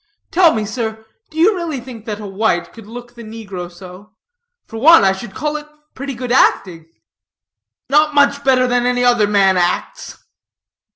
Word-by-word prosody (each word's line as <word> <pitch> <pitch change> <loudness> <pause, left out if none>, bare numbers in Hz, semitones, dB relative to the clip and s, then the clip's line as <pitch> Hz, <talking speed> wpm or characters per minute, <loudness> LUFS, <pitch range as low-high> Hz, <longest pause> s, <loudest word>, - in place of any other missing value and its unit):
Tell 345 -2 +5
me, 215 -1 -2
sir, 220 0 -5 0.2
do 315 - -14
you 385 +6 +4
really 335 -6 -4
think 235 -3 -11
that 210 -1 -4
a 210 - -8
white 190 -4 -1
could 225 -3 -13
look 240 +1 -10
the 235 -1 -12
negro 200 -5 -8
so? 185 +4 -14 0.5
For 225 - -9
one, 325 +3 +7
I 190 - +4
should 195 +1 -8
call 300 +2 -2
it 300 0 -10 0.3
pretty 275 0 -6
good 245 0 -5
acting." 170 -9 +1 1.0
"Not 300 +2 +2
much 285 0 +3
better 260 -2 +3
than 245 0 0
any 250 0 0
other 240 -4 +3
man 195 -2 +3
acts." 180 - -2
235 Hz, 175 wpm, -17 LUFS, 200-275 Hz, 1.0 s, one